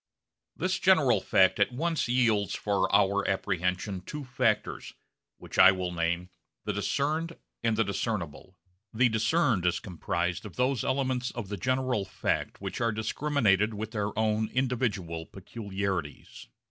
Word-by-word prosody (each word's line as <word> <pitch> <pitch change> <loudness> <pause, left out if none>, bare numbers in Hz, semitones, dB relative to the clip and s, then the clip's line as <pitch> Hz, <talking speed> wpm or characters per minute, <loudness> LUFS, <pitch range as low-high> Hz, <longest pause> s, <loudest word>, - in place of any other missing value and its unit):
This - - -1
general - - +4
fact 95 +1 +3
at 100 - +3
once 160 +4 -1
yields 115 -6 +2
for 100 -2 0
our 100 0 +3
apprehension 90 0 -1
two 150 +9 -7
factors, 125 -3 -1 0.4
which - - -6
I - - +10
will 90 -2 -3
name, 85 +1 -2 0.3
the 105 - -1
'discerned' 155 - -1 0.2
and 115 -2 +1
the 115 - +4
'discernible.' 95 -4 -4 0.4
The 125 +2 +4
discerned 110 - +2
is 90 - +1
comprised 90 -1 -3
of 105 -5 -10
those 125 -2 +1
elements 130 -2 0
of 115 -5 -6
the 105 - -3
general 130 +1 0
fact - - -2
which - - -5
are 115 -1 +2
discriminated 110 -2 +1
with 110 +1 -5
their 105 -2 -3
own 110 0 +1
individual 110 -11 -1
peculiarities. 95 - -5
105 Hz, 140 wpm, -28 LUFS, 95-125 Hz, 0.4 s, I